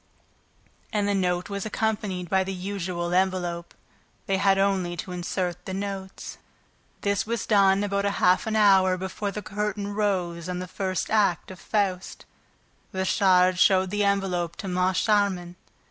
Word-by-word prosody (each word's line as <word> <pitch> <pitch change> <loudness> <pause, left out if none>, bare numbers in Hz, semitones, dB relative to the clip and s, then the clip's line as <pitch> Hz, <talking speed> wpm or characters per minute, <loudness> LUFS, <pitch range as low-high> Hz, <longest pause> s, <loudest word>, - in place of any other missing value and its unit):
And 205 -1 0
the 205 - +1
note 180 -2 0
was 200 -1 -4
accompanied 210 -4 -2
by 190 +2 +2
the 190 0 -4
usual 180 -2 -3
envelope. 180 -2 -1 0.5
They 195 - +1
had 195 0 +3
only 190 -3 +1
to 180 - -6
insert 180 0 -3
the 190 - -4
notes. 195 -1 -6 0.6
This 200 0 0
was 235 0 -2
done 200 -1 +4
about 200 0 -1
half 190 -1 +2
an 220 - -1
hour 190 -3 +5
before 190 +2 -4
the 210 +1 -6
curtain 205 +2 -3
rose 180 -5 -1
on 180 - -3
the 180 0 -5
first 185 0 -3
act 200 -5 +1
of 185 - -11
Faust. 195 -4 -2 0.7
Richard 185 -1 +3
showed 185 -1 +4
the 205 0 +1
envelope 185 -4 0
to 195 - -7
Moncharmin. 185 0 +1
190 Hz, 145 wpm, -25 LUFS, 180-200 Hz, 0.7 s, hour